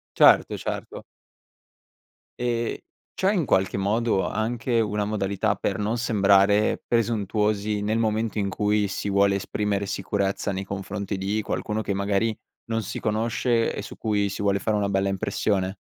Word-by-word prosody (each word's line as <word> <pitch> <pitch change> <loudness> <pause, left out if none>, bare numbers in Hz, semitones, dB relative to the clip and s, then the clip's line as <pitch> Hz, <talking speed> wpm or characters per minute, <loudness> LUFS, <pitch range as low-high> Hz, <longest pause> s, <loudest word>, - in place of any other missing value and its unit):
Certo, - - +6
certo. - - -5 1.3
Ehm, 120 -1 -1 0.4
c'è 190 +1 +1
in 180 -7 +1
qualche 95 -4 +1
modo 105 +1 +1
anche 115 +2 -1
una 105 -1 0
modalità 100 0 0
per 100 0 -2
non 110 +3 -1
sembrare 100 -1 +3
presuntuosi, 105 -2 0
nel 110 +2 0
momento 110 0 0
in 100 -1 0
cui 105 +1 +1
si 100 - -4
vuole 100 0 +3
esprimere 100 0 -1
sicurezza 100 +1 -1
nei 95 0 -3
confronti 100 +1 -4
di 100 +3 -1
qualcuno, 105 +2 -2
che 100 - -2
magari 100 +3 0 0.3
non 115 -1 -1
si 100 - -5
conosce, 115 +2 +1
e - - -4
su - - -9
cui 105 -2 0
si 100 - -5
vuole 100 -1 +2
fare 105 +2 0
una 100 -1 0
bella 95 0 +1
impressione? 95 0 -1
105 Hz, 150 wpm, -25 LUFS, 100-110 Hz, 1.3 s, Certo